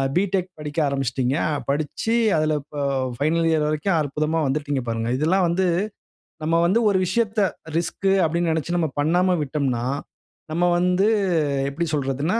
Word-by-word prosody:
B.Tech 185 0 +1
படிக்க 150 0 -7
ஆரம்பிச்சிடீங்க. 135 0 -1 0.3
படிச்சி 150 +10 -1 0.2
அதில 155 0 +1 0.2
ப 145 -1 -2 0.4
பைனல் 165 +3 +2
இயர் 155 -2 +2
வரைக்கும் 155 +5 0
அற்புதமா 155 +2 -1
வந்துட்டீங்க 145 0 -1
பாருங்க. 115 0 -2
இதெல்லாம் 180 +6 +2
வந்து 185 +3 +1 0.8
நம்ம 165 +2 +1
வந்து 190 +7 +3
ஒரு 195 - +2
விஷயத்த 215 +3 0 0.4
ரிஸ்க்கு 190 +3 0
அப்டினு 170 +1 0
நினைச்சி 160 +2 -1
நம்ம 165 -2 +1
பண்ணாம 180 +4 +2
விட்டோம்னா, 135 -4 -1 0.7
நம்ம 170 +3 +1
வந்து 180 +3 +2 0.6
எப்படி 165 +5 -2
சொல்றதுனா, 145 - 0
155 Hz, 135 wpm, -23 LUFS, 145-180 Hz, 0.8 s, வந்து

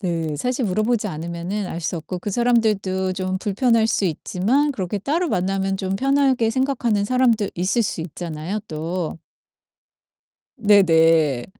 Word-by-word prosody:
네 165 -5 -2
사실 250 - -1
물어 205 +2 0
보지 225 -3 0
않으면은 170 +4 -4
알 170 - -5
수 170 +1 -2
없고 165 +3 -5
그 205 - -4
사람들도 205 -5 +1
좀 185 0 -2
불편할 220 +3 +2
수 225 -2 0
있지만 205 - 0
그렇게 200 -3 -3
따로 320 - -1
만나면 195 0 -1
좀 190 0 -2
편하게 270 -2 +2
생각하는 240 -5 0
사람도 235 -3 +2
있을 185 +7 +1
수 195 - -3
있잖아요 165 +3 -5
또. 165 +2 -4 1.4
네네. 165 - +4
195 Hz, 295 characters per minute, -22 LUFS, 175-230 Hz, 1.4 s, 네네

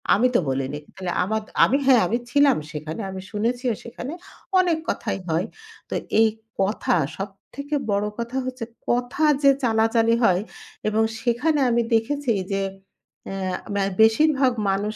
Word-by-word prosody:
আমি 240 +5 +4
তো - - +6
বলিনি। 135 +2 -2 0.2
তাহলে 185 -2 -4
আমার 220 +3 -1 0.2
আমি 270 - +2
হ্যাঁ, 260 -4 +6
আমি 235 - +1
ছিলাম 285 -2 +5
সেখানে। 155 +6 -5
আমি 190 - -6
শুনেছিও 240 +3 0
সেখানে। 245 +5 -7 0.5
অনেক 350 -3 +2
কথাই 215 - -2
হয়।" 165 +5 0 0.4
তো - - -3 0.3
এই 225 - +6 0.3
কথা 195 0 +1 0.2
সবথেকে 210 +9 -6 0.2
বড় 200 +1 +1
কথা 235 +3 -3
হচ্ছে 255 -2 -4 0.2
কথা 245 +5 0 0.2
যে 275 - +8
চালাচালি 225 0 +3
হয় 185 -4 +4 0.5
এবং 220 +1 +2 0.2
সেখানে 250 +6 +1
আমি 235 0 +3
দেখেছি 260 +3 0 0.2
যে, 195 - 0 0.7
আ - - -4 0.4
মে 200 - +1 0.2
বেশিরভাগ 265 +4 +4 0.2
মানুষ 205 +2 -1
230 Hz, 145 wpm, -23 LUFS, 200-255 Hz, 0.7 s, যে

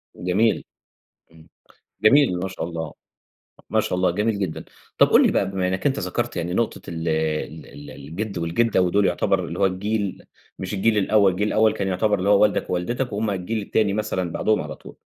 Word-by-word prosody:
جميل. 100 +6 +1 0.7
إمم. 80 -1 -18 0.5
جميل، 110 -5 +5
ما 95 - -2
شاء 95 -3 -5
الله. 80 -3 -5 0.8
ما - - +3
شاء - - -2
الله، 90 - +2
جميل 105 +3 0
جدًا. 95 -6 -3 0.3
طب - - +7
قُل - - +6
لي - - +2
بقى - - +1
بما 95 -1 -1
إنّك 95 +6 -2
أنت 140 -1 +1
ذكرت 115 +6 -3
يعني 85 +1 -2
نقطة 115 +1 -1
ال 80 0 -4
ال 80 0 -2
ال 75 +1 -11
الجِد 90 +9 -6
والجِدّة 90 +6 +1
ودول 95 +2 +2
يعتبر 95 -2 +1
اللي 85 +1 -6
هو 100 - +4
الجيل 100 +1 -2 0.3
مش 95 +2 -4
الجيل 105 +2 +2
الأول، 100 -1 +3
الجيل 100 +4 -1
الأول 110 0 +3
كان 100 - -2
يعتبر 100 +2 +1
اللي 95 - -1
هو 100 0 +5
والدك 105 -1 +1
ووالدتك 120 +8 -2
وهُم 105 +1 -1
الجيل 100 +3 -3
التاني 100 0 +1
مثلًا 95 -5 -2
بعدهم 110 +5 +1
على - - -7
طول، - - -14
95 Hz, 195 wpm, -23 LUFS, 90-105 Hz, 0.8 s, طب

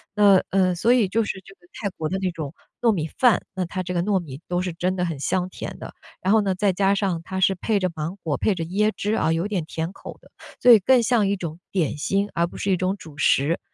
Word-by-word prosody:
那， 200 -2 +6
嗯， 185 -2 +2
所 225 +8 +3
以 240 -5 +3
就 225 +4 +1
是 190 -2 -5
这 195 - -14
个 - - -55
泰 200 - -3
国 155 -1 -2
的 190 - -1
那 190 -1 -1
种 155 -3 -6 0.3
糯 235 -2 +4
米 165 -7 -1
饭， 245 -4 +4
那 185 -2 -2
它 185 +1 -4
这 180 0 -4
个 175 - +1
糯 200 0 +1
米 145 -4 -9
都 180 0 0
是 180 -2 -3
真 180 +2 -1
的 180 -1 0
很 165 -5 -4
香 180 +5 -1
甜 - - -7
的。 - - -8 0.3
然 190 +3 +2
后 220 - +5
呢， 195 -2 0
再 200 0 +1
加 195 +1 +2
上 190 -4 -1
它 190 +2 -4
是 190 0 +3
配 210 +3 0
着 185 -1 0
芒 160 +5 -4
果、 150 -4 -1
配 215 - +1
着 170 - -3
椰 210 +5 +1
汁 210 +2 -1
啊， 160 - +1
有 165 +4 -1
点 200 -5 -2
甜 165 +2 -4
口 - - -10
的， - - -20 0.3
所 250 - +7
以 225 - +9
更 245 +5 +4
像 225 -3 +2
一 200 - +1
种 170 -3 -6
点 170 -7 0
心， 195 +7 0
而 170 0 +1
不 - - -11
是 200 - -2
一 185 - +3
种 185 +2 -1
主 155 -6 -13
食。 155 +1 +2
185 Hz, 295 characters per minute, -23 LUFS, 170-200 Hz, 0.3 s, 以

